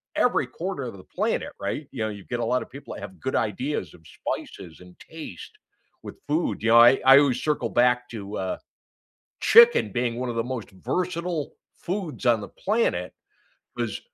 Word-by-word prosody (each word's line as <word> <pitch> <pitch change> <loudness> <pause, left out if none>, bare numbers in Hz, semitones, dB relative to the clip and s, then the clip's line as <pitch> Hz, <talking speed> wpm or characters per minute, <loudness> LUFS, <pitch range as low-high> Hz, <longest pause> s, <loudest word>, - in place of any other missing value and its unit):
every - - +2
corner 180 -5 -5
of 115 -5 -6
the 95 - -13
planet, - - -2
right? 100 +9 -4
You 120 -5 -3
know, 110 - -1
you 100 -2 -8
get 120 - -3
a 115 - 0
lotta 125 +2 0
people 140 +3 -10
that - - -8
have 95 -3 -9
good 130 - -3
ideas 105 - -2
of 80 - -17
spices 80 +1 -6
and 90 0 -16
taste 165 - -10 0.5
with - - -8
food, 155 -5 -1
you 115 - +2
know, 115 +1 +8
I 120 +3 +7
I 135 +1 +9
always 130 -3 +2
circle 150 -6 0
back 125 +1 +2
to, 105 -2 -6
uh, 95 -1 -2 0.8
chicken 470 +1 +6
being 120 -1 -1
one 125 +1 -3
of 120 - -3
the 115 - 0
most 125 -4 -5
versatile 170 - -3 0.2
foods 175 -7 -4
on 115 -2 +4
the - - -7
planet, 220 +4 -1 0.6
'cause - - -2
125 Hz, 185 wpm, -25 LUFS, 110-150 Hz, 0.8 s, I